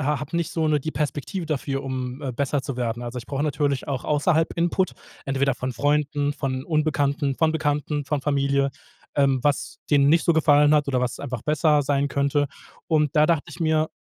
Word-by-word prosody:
ha 150 0 0
hab 150 +2 -7
nicht 170 -1 0
so 160 -2 0
'ne 150 -2 +2
die 155 - -3
Perspektive 155 +4 -3
dafür, 140 -2 -2
um, 130 0 -4
äh, 130 -3 -3
besser 140 +2 -1
zu 135 -2 -5
werden. 120 -1 -2
Also, 120 +1 -5
ich 120 - -8
brauche 140 0 -2
natürlich 145 -2 -1
auch 135 -3 -3
außerhalb 160 +2 +2
Input, 175 +2 +1 0.3
entweder 135 -1 +1
von 130 +1 -4
Freunden, 145 +2 0
von 130 -2 -3
Unbekannten, 145 -3 0
von 160 -1 +2
Bekannten, 150 -1 -1
von 145 0 -1
Familie, 140 -1 +1 0.4
ähm, 135 -2 +3
was 145 -2 -1
denen 140 -1 +5
nicht 165 +1 +3
so 170 - +4
gefallen 150 -1 +5
hat 145 -2 +2
oder 130 -2 +1
was 125 0 -2
einfach 125 -5 -5
besser 150 -1 +2
sein 140 0 +1
könnte. 140 +1 +1 0.4
Und 150 -3 +2
da 150 0 +6
dachte 165 -4 +1
ich - - -11
mir 155 -1 +2
145 Hz, 200 wpm, -24 LUFS, 135-150 Hz, 0.4 s, da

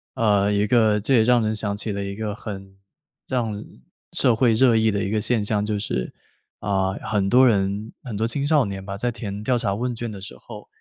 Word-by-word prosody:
呃， 105 -4 +2
一 100 0 +2
个 110 -2 +3
这 120 +7 0
也 115 - +6
让 120 -1 +4
人 110 0 0
想 100 -1 -2
起 105 +1 -3
了 100 0 -3
一 100 0 -5
个 105 -1 -3
很 95 -3 -8 0.5
让 115 -5 -2 0.5
社 120 - +3
会 115 -1 +3
热 120 -1 +4
议 110 0 +3
的 100 -1 -1
一 100 - -2
个 110 -1 0
现 110 -2 +1
象， 105 -1 +1
就 105 0 -1
是， 65 -11 -3 0.5
啊， 95 -2 0
很 100 -3 0
多 130 +1 +6
人 100 0 0
很 115 -5 -5
多 110 - 0
青 140 +4 -2
少 145 -5 +4
年 95 -1 -5
吧， 100 0 -6
在 120 +4 -1
填 105 -2 -6
调 125 +2 +1
查 100 - -1
问 120 +3 -2
卷 115 -1 -5
的 100 - -8
时 100 +3 -9
候， 105 -3 -11
105 Hz, 245 characters per minute, -23 LUFS, 100-115 Hz, 0.5 s, 也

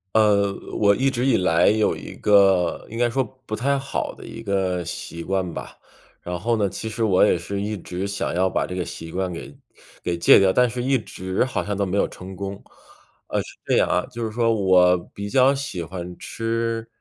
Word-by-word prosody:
呃， 100 -2 +4 0.2
我 100 -1 +4
一 135 +4 +2
直 125 0 -1
以 135 -3 +4
来 90 -4 +3
有 110 0 +3
一 - - -8
个 95 -4 +3
应 115 - -7
该 120 0 +2
说 135 +3 0 0.2
不 - - -7
太 140 +6 +1
好 135 0 -3
的 - - -12
一 115 - -8
个 95 -4 0
习 85 0 -6
惯 95 -2 -1
吧， - - -8 0.4
然 90 0 -4
后 115 +5 +1
呢， 105 -3 +1
其 110 - -6
实 110 +1 -2
我 95 -4 +4
也 - - +3
是 100 +4 -4
一 105 +1 -2
直 90 +2 -5
想 100 - -2
要 95 +2 +2
把 - - 0
这 - - -7
个 90 -1 -2
习 80 0 -8
惯 95 -1 -2
给 85 - -8 0.5
给 85 -1 -2
戒 85 - +7
掉， 95 -1 +4
但 125 -1 +4
是 125 +1 -4
一 135 +1 +3
直 95 -4 -2
好 130 +1 -2
像 105 - -2
都 100 0 0
没 95 +2 -1
有 - - +2
成 95 +1 -10
功。 100 +1 -6 0.6
呃， - - -1
是 - - -11
这 - - +2
样 - - +3
啊， 90 - +1
就 120 -2 -5
是 110 - -2
说 115 0 +2
我 90 -3 +4 0.2
比 100 0 -5
较 135 +3 +5
喜 135 -11 -4
欢 90 0 -7
吃 115 0 -2
100 Hz, 235 characters per minute, -23 LUFS, 90-115 Hz, 0.6 s, 戒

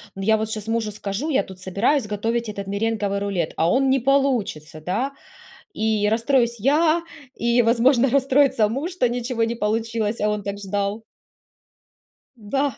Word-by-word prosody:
ну, 195 - -6
я 220 +2 +3
вот 220 0 -2
щас 215 -1 -4
мужу 225 -1 -1
скажу, 210 +7 -4
я 280 -3 +2
тут 190 -1 -12
собираюсь 210 +8 0
готовить 225 +2 -2
этот 200 -1 -5
меренговый 205 -1 -1
рулет, 195 -5 -2
а 165 - +2
он 270 +4 +2
не 270 0 +3
получится, 235 - 0
да. 215 - -2 0.6
И 215 -1 0
расстроюсь 235 +1 +1
я, 310 +8 +3 0.3
и, 235 +1 +2
возможно, 240 +3 +3
расстроится 270 -3 +3
муж, 275 - -3
что 345 -9 +1
ничего 240 -1 -2
не 230 +1 -1
получилось, 225 0 -1
а 210 - +2
он 210 -1 -2
так 200 0 -4
ждал. 200 +2 -3 1.3
Да. 265 +4 -2
225 Hz, 160 wpm, -22 LUFS, 205-255 Hz, 1.3 s, я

